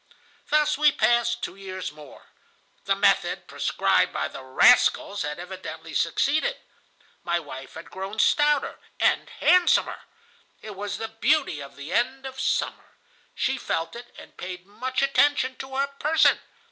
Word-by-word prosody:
"Thus 300 -1 +2
we 300 -1 +6
passed 235 0 +1
two - - -4
years 190 -1 -6
more. 150 -2 -14 0.6
The - - +2
method - - +2
prescribed - - +1
by - - -2
the - - -9
rascals 200 - +4
had 150 0 -3
evidently 185 +2 -8
succeeded. 310 - +1 0.7
My 170 0 0
wife 135 -4 -10
had - - -10
grown 195 +3 -6
stouter 295 +5 +2 0.2
and - - +2
handsomer. 360 -1 +2 0.5
It 215 -2 -9
was 205 0 -4
the 225 +1 -4
beauty 225 - +1
of 140 - -10
the 140 +4 -7
end 260 +3 0
of 265 0 -7
summer. - - -2 0.4
She 265 -1 -1
felt 165 -3 -3
it, 240 0 -10
and - - -14
paid 180 0 -7
much 255 +7 -3
attention 275 -1 +2
to 265 0 -8
her 275 +1 +2
person. 290 +3 +2
235 Hz, 145 wpm, -25 LUFS, 185-275 Hz, 0.7 s, we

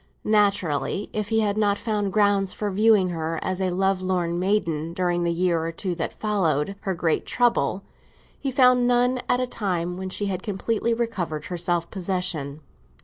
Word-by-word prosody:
Naturally, 200 - +1
if 210 -1 -2
he 225 0 +2
had 205 -1 0
not 205 -1 +2
found 210 -3 -1
grounds 200 -2 +2
for 210 -1 -3
viewing 205 -1 +4
her 165 -1 -3
as 185 0 -2
a 185 - +1
lovelorn 185 -2 0
maiden 170 -5 0
during 175 -1 0
the 170 - +1
year 170 -1 +1
or 165 - -2
two 180 +2 -3
that 165 -1 -4
followed 195 -5 0
her 190 -3 -2
great 165 -1 0
trouble, 200 - +1 0.6
he 275 - -2
found 250 -2 +4
none 245 +1 +2
at 245 - +3
a 255 - +1
time 180 -7 -2
when 190 0 -4
she 205 +2 -1
had 190 -2 -2
completely 225 +3 -1
recovered 185 -10 -3
her 180 - -4
self 170 0 -1
possession. 180 -6 -2
190 Hz, 175 wpm, -24 LUFS, 175-210 Hz, 0.6 s, viewing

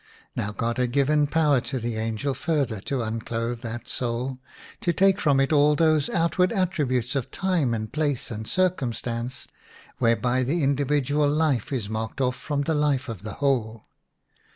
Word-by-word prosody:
Now 100 - -2
God 115 +3 -2
had 125 -1 +1
given 145 +1 +3
power 150 -4 +3
to 130 - -3
the 115 0 -3
angel 115 +5 -1
further 135 -5 -1
to 130 +3 -2
unclothe 115 +1 -3
that 120 +1 -6
soul, 125 +2 -3 0.4
to 175 - +1
take 195 +4 +3
from 140 -3 +3
it 135 +3 +2
all 150 0 +5
those 155 -1 +3
outward 175 +2 +2
attributes 145 - 0
of 135 -4 -1
time 175 -11 0
and 110 -1 -5
place 145 -6 -1
and 110 0 -5
circumstance 125 - -1 0.5
whereby 120 +2 +2
the 145 +6 0
individual 145 +1 +2
life 145 -6 +1
is 120 -7 -2
marked 110 +4 -4
off 125 -1 +1
from 145 0 -2
the 160 - 0
life 145 -4 +1
of 110 -6 -6
the 105 -1 -6
whole. 115 -5 -1
130 Hz, 165 wpm, -25 LUFS, 115-150 Hz, 0.5 s, all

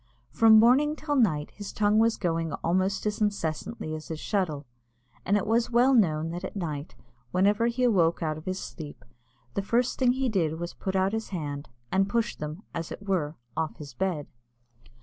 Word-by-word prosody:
From 225 -1 +7
morning 265 +7 +5
till 300 -1 -2
night 160 - +2
his 205 -1 -8
tongue 210 0 +3
was 225 0 +3
going 165 -3 -1
almost 185 +4 +1
as 210 0 -1
incessantly 165 -3 -2
as 155 0 -6
his 160 -2 -5
shuttle; 160 -9 -1 0.6
and 200 +2 +2
it 200 - -1
was 230 +2 +2
well 245 +3 +4
known 165 -8 +3
that 175 +2 -5
at 190 - -6
night, 155 -5 -4 0.3
whenever 205 - +3
he 240 +2 -1
awoke 175 -8 +3
out 155 -1 0
of 155 - -10
his 185 0 -2
sleep, 150 -3 -9 0.5
the - - 0
first 235 +5 0
thing 250 -2 +4
he 265 0 0
did 165 -8 0
was 175 0 -4
to - - -24
put 190 0 -3
out 190 +2 +2
his 220 0 -3
hand, 145 -5 -5 0.2
and 195 +1 +2
push 235 +1 0
them, 155 +6 -6
as 165 -1 -4
it 205 - -8
were, 165 -6 0 0.2
off 160 -1 -2
his 145 -4 -9
bed. 170 -1 -1
190 Hz, 195 wpm, -27 LUFS, 160-225 Hz, 0.6 s, From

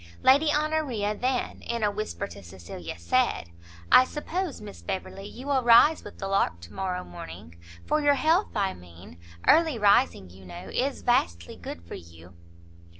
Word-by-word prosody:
Lady 285 +4 +5
Honoria 295 -9 0
then, 250 +2 -2
in 235 -1 -3
a 205 - +2
whisper 210 0 -4
to 200 - -11
Cecilia, 85 -2 -9
said, 85 0 0 0.4
"I - - +9
suppose, 315 +4 -4
Miss 210 -1 -10
Beverley, 195 0 -5
you 250 +5 -10
will 280 -2 +1
rise 240 +6 +6
with - - -11
the 195 - -4
lark 195 - +1
to 85 - -12
morrow 185 -1 -3
morning? 85 -1 -11 0.3
for 305 - +1
your 290 -1 +4
health, 325 +7 +2
I 195 -3 0
mean. 85 -1 -14 0.3
Early 320 -5 +5
rising, 205 - +3
you 95 +1 -15
know, 90 -1 -9
is 270 +2 -1
vastly 85 - 0
good 85 - -8
for 85 - -11
you." 85 +1 -12
205 Hz, 165 wpm, -27 LUFS, -, 0.4 s, I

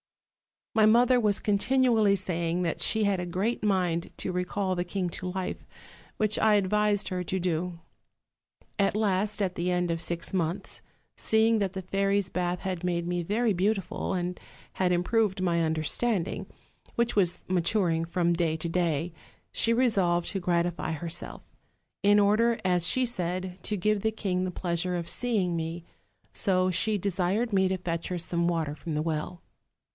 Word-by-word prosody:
"My 220 -1 +5
mother 245 +3 +5
was 210 -4 +1
continually 220 -1 +3
saying 175 -2 -1
that 165 - -2
she 220 -1 +2
had 200 -2 +1
a 180 - -3
great 190 +7 -1
mind 180 -4 0
to 185 - -2
recall 185 +1 -1
the 175 -1 -2
king 180 0 -2
to 185 - -6
life, 185 0 -4 0.5
which 215 -1 0
I 215 -1 +4
advised 205 +1 +1
her 180 -1 -3
to 190 - -2
do. 175 -1 -2 1.0
At 195 0 +2
last, 210 0 0
at 190 -2 0
the 175 +1 -1
end 180 -1 +1
of 165 0 -2
six 170 -1 -2
months, 175 +1 -2 0.4
seeing 220 0 +3
that 195 -2 -1
the 190 - -4
fairies' 195 +1 0
bath 180 -1 -2
had 185 -2 -3
made 170 -1 -1
me 175 0 -1
very 215 +6 +1
beautiful, 195 +1 -1
and 180 -1 -2 0.4
had 180 -1 +2
im 175 0 +1
proved 210 -2 +1
my 170 -2 +1
understanding, 165 +5 -1 0.5
which 235 -1 0
was 180 -2 +2
maturing 175 -2 +1
from 170 0 0
day 165 -2 0
to 160 +1 -4
day, 165 -1 0 0.4
she 230 - +1
resolved 195 -9 +2
to 195 - -2
gratify 175 -2 0
herself; 165 +1 -4 0.6
in 205 +1 +5
order, 215 +3 +3
as 180 -2 +2
she 255 +8 +3
said, 185 -4 -3
to 210 - -2
give 210 +2 +1
the 220 - +1
king 185 -4 -1
the 185 - -3
pleasure 180 0 -2
of 170 -1 -2
seeing 210 -8 0
me: 165 +1 -4 0.5
so 185 -2 +1
she 210 +4 +1
desired 200 +4 0
me 190 -1 +3
to 190 0 -1
fetch 170 -2 -3
her 180 - -3
some 170 0 -1
water 165 -4 -1
from 155 +1 -5
the 150 - 0
well. 165 +2 -3
185 Hz, 170 wpm, -28 LUFS, 175-205 Hz, 1.0 s, My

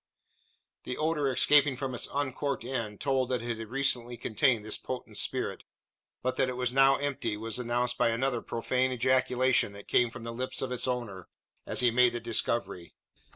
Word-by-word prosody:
The 125 - -5
odour 155 -3 0
escaping 140 +1 +4
from 130 -1 -3
its 120 - -2
uncorked 140 -1 -2
end 115 -5 -4
told 135 -2 0
that 125 -2 -1
it 120 -1 -3
had 115 - -6
recently 125 -1 0
contained 115 -1 +1
this 110 - +1
potent 130 - -6
spirit; - - -1 0.6
but 130 0 -1
that 130 - +2
it 125 - -4
was 125 -1 0
now 135 0 +6
empty, 135 -7 -2
was 115 +2 -2
announced 120 0 -1
by - - +4
another 120 +1 0
profane 130 +2 -1
ejaculation 130 -2 +2
that 100 0 -12
came 120 -1 +3
from 115 0 -10
the 115 0 -5
lips 130 +3 -2
of 130 - -3
its 125 +1 0
owner, 115 -8 -4 0.4
as - - +1
he 120 -1 +4
made 125 0 +4
the 120 - -3
discovery. 105 -6 -2
125 Hz, 185 wpm, -29 LUFS, 115-130 Hz, 0.6 s, now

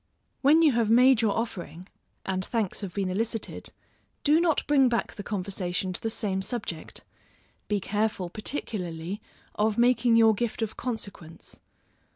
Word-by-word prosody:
When 305 +4 +6
you 310 - +6
have 230 -3 +1
made 250 +1 +6
your 215 -3 +1
offering, 185 -5 -5 0.4
and 185 -1 0
thanks 220 -2 -2
have 195 -3 -4
been 190 -1 -2
elicited, 225 +2 -3 0.5
do 305 +2 +5
not 335 -3 +2
bring 275 -3 +4
back 235 -1 -1
the 210 - -7
conversation 185 -2 -3
to - - -5
the 225 - -1
same 205 -4 -2
subject; 190 -7 -5 0.6
be 205 -1 0
careful, 210 -2 -1
particularly, 190 - -4 0.3
of 215 +1 0
making 240 -1 +4
your 225 -1 +6
gift 230 +1 -2
of 220 - -4
consequence. 200 -9 -7
215 Hz, 150 wpm, -27 LUFS, 190-235 Hz, 0.6 s, When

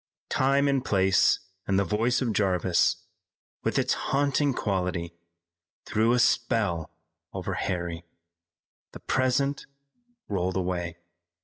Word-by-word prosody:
Time 140 +2 +3
and 135 -2 +1
place 95 -5 +3 0.3
and 95 - +2
the 100 - +3
voice 115 +7 +1
of 115 -3 -1
Jarvis, 95 -3 +1 0.6
with - - 0
its - - +2
haunting 140 +1 +1
quality, 90 -7 -2 0.7
threw 110 +2 +2
a - - +3
spell 115 - +1 0.4
over - - -3
Harry. 85 -2 -3 0.9
The - - -9
present 135 +2 0 0.6
rolled 95 -2 -1
away. 90 -2 -2
100 Hz, 110 wpm, -27 LUFS, 90-125 Hz, 0.9 s, Time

